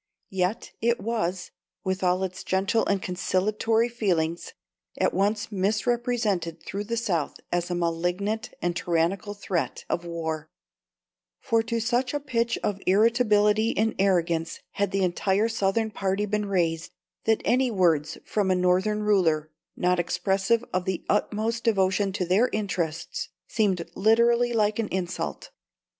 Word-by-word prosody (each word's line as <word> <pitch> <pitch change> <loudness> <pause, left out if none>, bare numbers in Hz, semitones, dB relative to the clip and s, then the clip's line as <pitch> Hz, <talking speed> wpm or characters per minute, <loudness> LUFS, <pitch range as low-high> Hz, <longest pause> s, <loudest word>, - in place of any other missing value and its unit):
Yet 190 +2 -1
it 235 +1 +2
was, 190 -5 -2 0.3
with 190 0 -1
all 180 +1 +2
its 185 -1 -4
gentle 190 +4 +1
and 200 -2 0
conciliatory 215 +5 +1
feelings, 175 -8 -1 0.4
at - - +1
once 210 +3 0
misrepresented 210 -4 0
through 205 +1 -4
the 230 +2 -2
South 180 -10 -1
as 175 0 0
a 175 - -1
malignant 175 +6 -1
and 175 0 0
tyrannical 180 +4 0
threat 190 -4 -3
of 170 - -1
war; 160 -2 -4 0.9
for 230 -4 +2
to 230 +1 -2
such 245 +4 0
a - - +1
pitch 235 -4 0
of 200 -1 -1
irritability 215 +1 +3
and 220 +1 +2
arrogance 170 -4 +1
had 200 0 0
the 195 0 0
entire 190 +4 +1
Southern 220 0 0
party 195 0 -1
been 210 0 -1
raised, 165 -4 0 0.3
that 220 -1 +2
any 255 +1 +3
words 170 -8 +2
from 205 -3 0
a 185 - +3
Northern 185 +4 +2
ruler, 165 -7 +2 0.3
not 180 0 +2
expressive 190 +6 +1
of 185 0 0
the 190 -2 -3
utmost 220 +2 0
devotion 195 -2 +2
to 185 -2 -1
their 195 +8 +3
interests, 175 -6 -3 0.2
seemed 190 -6 0
literally 235 +3 +3
like 215 -1 +1
insult. 190 -5 -3
195 Hz, 140 wpm, -26 LUFS, 180-225 Hz, 0.9 s, irritability